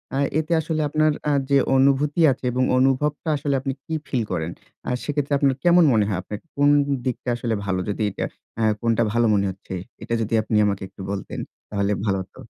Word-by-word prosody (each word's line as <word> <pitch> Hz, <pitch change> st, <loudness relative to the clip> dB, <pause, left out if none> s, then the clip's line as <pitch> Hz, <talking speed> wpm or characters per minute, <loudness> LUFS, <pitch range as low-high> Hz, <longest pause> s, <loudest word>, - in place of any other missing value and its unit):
আ -, -, 0 dB, 0.2 s
এতে 160 Hz, +1 st, -4 dB
আসলে 155 Hz, 0 st, -2 dB
আপনার 155 Hz, +1 st, +3 dB, 0.2 s
আ -, -, +3 dB, 0.2 s
যে 140 Hz, -, +5 dB, 0.2 s
অনুভূতি 140 Hz, +4 st, +3 dB
আছে 130 Hz, -, -5 dB
এবং 125 Hz, +1 st, +1 dB
অনুভবটা 140 Hz, +4 st, +1 dB
আসলে 140 Hz, -1 st, -1 dB
আপনি 135 Hz, -1 st, -2 dB
কি 160 Hz, -, -5 dB
ফিল 120 Hz, -4 st, 0 dB
করেন? 85 Hz, -1 st, -2 dB, 0.4 s
আ -, -, 0 dB
সেক্ষেত্রে 145 Hz, -1 st, -1 dB
আপনার 135 Hz, -2 st, +2 dB
কেমন 175 Hz, 0 st, +6 dB
মনে 105 Hz, -2 st, +3 dB
হয় 100 Hz, -3 st, -1 dB
আপনার 105 Hz, +2 st, -7 dB, 0.2 s
কোন 145 Hz, 0 st, +4 dB, 0.4 s
দিকটা 125 Hz, 0 st, -2 dB
আসলে 115 Hz, -2 st, -2 dB
ভালো? 95 Hz, -2 st, 0 dB
যদি 100 Hz, -, -3 dB
এটা -, -, -3 dB, 0.4 s
আ -, -, +2 dB, 0.2 s
কোনটা 115 Hz, 0 st, +2 dB
ভালো 120 Hz, 0 st, +3 dB
মনে 100 Hz, -1 st, +2 dB
হচ্ছে 95 Hz, 0 st, -10 dB, 0.3 s
এটা -, -, -4 dB
যদি 110 Hz, 0 st, -3 dB
আপনি 110 Hz, 0 st, -2 dB
আমাকে 100 Hz, -1 st, -1 dB
একটু -, -, -13 dB
বলতেন 100 Hz, -2 st, -5 dB, 0.3 s
তাহলে 100 Hz, 0 st, 0 dB
ভালো 95 Hz, -2 st, +1 dB
হত। 95 Hz, -, -27 dB
130 Hz, 200 wpm, -23 LUFS, 105-145 Hz, 0.4 s, কেমন